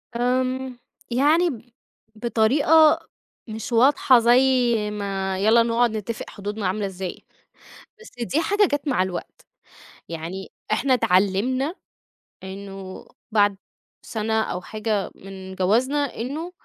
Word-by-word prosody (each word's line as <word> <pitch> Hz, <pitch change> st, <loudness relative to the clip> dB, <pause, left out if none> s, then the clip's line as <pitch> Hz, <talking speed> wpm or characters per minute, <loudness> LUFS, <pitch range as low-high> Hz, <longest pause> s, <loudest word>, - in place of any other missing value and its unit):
آمم، 255 Hz, +1 st, -1 dB, 0.3 s
يعني 310 Hz, +8 st, +3 dB
ب 245 Hz, -2 st, -9 dB, 0.4 s
بطريقة، 265 Hz, +8 st, +4 dB, 0.5 s
مش 220 Hz, +2 st, -6 dB
واضحة 255 Hz, +1 st, +5 dB
زي 240 Hz, +2 st, +5 dB, 0.5 s
ما 195 Hz, -2 st, -3 dB
يالّا 220 Hz, +4 st, +5 dB
نقعد 235 Hz, 0 st, +2 dB
نتفق 220 Hz, +2 st, -5 dB
حدودنا 205 Hz, 0 st, -4 dB
عاملة 200 Hz, +2 st, -1 dB
إزاي، 190 Hz, -1 st, -6 dB, 0.8 s
بس 450 Hz, -, -13 dB
دي 290 Hz, +7 st, 0 dB
حاجة 410 Hz, +4 st, +3 dB
جَات 290 Hz, +1 st, -1 dB
مع 255 Hz, -9 st, +2 dB
الوقت، 185 Hz, -2 st, -6 dB, 0.6 s
يعني 170 Hz, +4 st, -6 dB, 0.2 s
إحنا 260 Hz, +5 st, +2 dB
اتعلّمنا، 240 Hz, -, +1 dB, 0.7 s
إنّه 195 Hz, 0 st, -8 dB, 0.3 s
بعد، 205 Hz, -2 st, +3 dB, 0.4 s
سنة 220 Hz, 0 st, -1 dB
أو 180 Hz, -4 st, -3 dB
حاجة 215 Hz, -1 st, -2 dB
من 190 Hz, -1 st, -10 dB
جوازنا 255 Hz, +10 st, +1 dB
إنّه، 295 Hz, +9 st, -4 dB
220 Hz, 110 wpm, -23 LUFS, 195-260 Hz, 0.8 s, واضحة